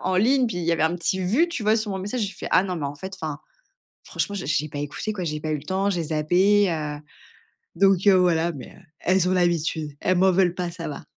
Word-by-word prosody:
en 185 0 -1
ligne, 250 +6 +3
puis 205 - -4
il 170 - -3
y 170 - +2
avait 160 -1 0
un 165 +2 +1
petit 175 +3 -1
vu, 230 - +2
tu 335 -9 -4
vois 215 +1 +3
sur 215 -2 -2
mon 190 - -3
message», 205 +6 -3
je - - +1
lui - - -11
fait: - - -6
«Ah - - +5
non, 185 -2 -3
mais 150 -4 -3
en 140 - -5
fait 190 +5 -7
enfin, 155 -6 -5 0.7
franchement, 205 - -3
j'ai 185 - -5
j'ai 150 0 0
pas 145 - -7
écouté 145 +9 -4
quoi, 185 -4 -4
j'ai 150 -1 -3
pas 155 - -4
eu - - +1
le - - -11
temps, 195 +3 0
j'ai 175 -4 -1
zappé, 180 +6 +3
heu». 150 -3 -3 0.8
Donc, 195 -1 +3
heu, 200 - +7
voilà, 170 -2 +2
mais, 135 -5 -9
heu, - - -17 0.2
elles, 185 -1 +2
ont - - +1
l'habitude, 170 -4 0
elles 185 - +1
m'en 190 +1 +5
veulent 180 -1 +2
pas, 180 -1 -3
ça 170 -1 -6
va. 145 - -7
180 Hz, 275 wpm, -24 LUFS, 160-195 Hz, 0.8 s, heu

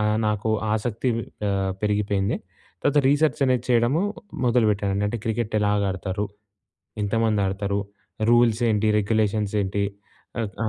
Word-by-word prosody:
ఆహ్, 105 0 +2
నాకు 105 +1 0 0.2
ఆసక్తి 115 +3 -1 0.4
ఆహ్, 95 -1 0
పెరిగిపోయింది. 105 -1 0 0.4
తర్వాత 145 0 +3
రీసెర్చ్ 145 +1 +2
అనేది 125 -1 +1
చేయడము 120 +8 +3 0.4
మొదలుపెట్టానండి. 105 -4 +2
అంటే 115 +2 -3
క్రికెట్ 110 -1 -2
ఎలాగాడతారు? 100 -1 0 0.8
ఎంతమంది 110 0 +1
ఆడతారు? 100 +1 -1 0.5
రూల్స్ 120 -1 +4
ఏంటి? 110 0 +2
రెగ్యులేషన్స్ 105 0 0
ఏంటి? 100 +1 -1 0.6
ఆహ్ 110 - -2 0.2
ఆ! - - +1
105 Hz, 120 wpm, -24 LUFS, 100-115 Hz, 0.8 s, రూల్స్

